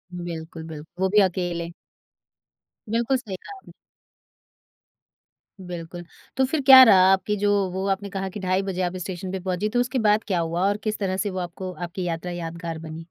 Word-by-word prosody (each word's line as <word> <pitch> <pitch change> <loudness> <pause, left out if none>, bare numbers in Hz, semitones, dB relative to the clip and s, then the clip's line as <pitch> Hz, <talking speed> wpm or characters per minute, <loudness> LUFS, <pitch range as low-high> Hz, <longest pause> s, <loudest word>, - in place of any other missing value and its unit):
बिल्कुल, 165 -2 -6
बिल्क 155 0 -9
वो 190 0 +2
भी - - +8
अकेले। 175 -2 -1 1.2
बिल्कुल, 235 +4 +1
सही 215 -7 -7
कहा 400 - -11
आपने। - - -16 1.9
बिल्कुल, 175 0 -7 0.3
तो 265 - +4
फिर 290 +3 -1
क्या 265 -1 +10
रहा 190 -5 +7
आपकी 210 +2 0
जो 205 +1 +1 0.2
वो 190 +1 -3
आपने 195 +1 -2
कहा 195 0 -4
की 205 - -7
ढाई 185 0 0
बजे 185 -1 -3
आप 180 0 -1
स्टेशन 185 0 -5
पे 190 - -3
पहुँची, 185 +3 -2
तो 245 +2 0
उसके 250 +1 0
बाद 210 0 +3
क्या 185 -4 0
हुआ? 170 +3 0
और 205 +1 +1
किस 215 -1 -2
तरह 190 -1 -1
से 200 +2 -1
वो 185 - -4
आपको 180 +1 -5
आपकी 175 +3 -5
यात्रा 170 +1 -3
यादगार 165 -1 -5
बनी? 160 0 -8
185 Hz, 190 wpm, -24 LUFS, 175-205 Hz, 1.9 s, क्या